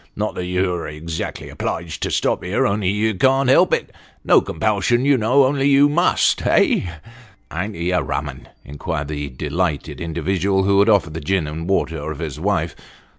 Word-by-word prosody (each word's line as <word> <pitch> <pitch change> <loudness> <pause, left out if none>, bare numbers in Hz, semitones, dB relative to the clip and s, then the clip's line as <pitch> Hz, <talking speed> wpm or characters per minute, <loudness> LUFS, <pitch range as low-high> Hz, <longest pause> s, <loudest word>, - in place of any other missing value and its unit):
" - - -41
Not 105 +1 -2
that 90 - -5
you're 90 -1 -1
exactly 80 +2 -6
obliged 85 -1 -4
to - - -1
stop - - 0
here, - - 0
only 100 -1 0
you 105 +2 0
can't 135 +6 +2
help 130 - +5
it. - - -1 0.3
No - - +5
compulsion, 110 +7 0
you 140 0 +4
know, 125 +4 +3
only 140 +1 +1
you 140 +1 +5
must 175 +5 +2
eh? 90 - +2 0.2
" 120 +2 -18
" 95 - -33
A'n't 100 +6 -4
he 85 +2 -2
a 90 -2 +2
rum 65 - -3
un? - - -10
" - - -37
inquired 75 +1 -4
the 75 -2 -4
delighted 80 +6 -3
individual, 95 +4 0
who 100 0 +3
had 100 +3 +4
offered 100 -7 +2
the 80 - -5
gin 90 +2 0
and 80 +4 -6
water, 80 -5 -1
of 80 - -6
his - - -5
wife. - - -1
95 Hz, 200 wpm, -20 LUFS, 80-110 Hz, 0.3 s, help